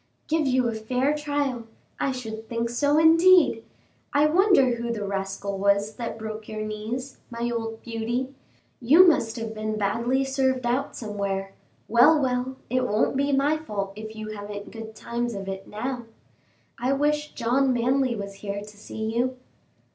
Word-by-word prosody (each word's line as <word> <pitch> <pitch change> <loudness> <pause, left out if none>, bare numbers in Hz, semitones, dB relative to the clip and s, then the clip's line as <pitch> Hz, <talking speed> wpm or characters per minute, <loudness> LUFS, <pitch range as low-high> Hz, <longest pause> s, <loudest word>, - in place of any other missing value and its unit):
"Give 310 -2 +1
you 255 -1 +2
a 230 - -1
fair 250 +6 0
trial! 285 -5 -2 0.3
I 275 - +1
should 220 -3 -6
think 235 -1 -2
so, 285 +4 +2
indeed! 330 -5 +6 0.5
I 290 +1 +5
wonder 330 - +4
who 235 0 -3
the 210 -3 -3
rascal 195 0 -3
was 200 +2 +2
that 235 -2 -4
broke 220 -1 -7
your 215 0 -4
knees, 225 +5 -5
my 235 0 -3
old 225 -1 -4
Beauty! 240 +3 -3 0.5
you 310 +10 +7
must 225 -9 +2
have 225 -2 -4
been 215 0 -3
badly 235 +6 +1
served 265 -1 0
out 255 +4 0
somewhere; 200 -3 -3 0.3
well, 245 +7 +6
well, 255 -1 -1
it 255 0 0
won't 215 +5 +1
be 280 +1 +1
my 280 +3 +2
fault 200 -10 -4
if 220 +1 -8
you 215 0 -6
haven't 205 -1 -7
good 225 -1 -9
times 235 0 -3
of 195 -1 -6
it 195 0 -5
now. 245 +3 -4 0.7
I 255 +3 +1
wish 295 +1 0
John 260 +3 +2
Manly 255 +1 +1
was 200 -2 -6
here 200 -1 -4
to 210 0 -12
see 220 +1 -5
you." 255 +2 0
235 Hz, 165 wpm, -25 LUFS, 215-270 Hz, 0.7 s, you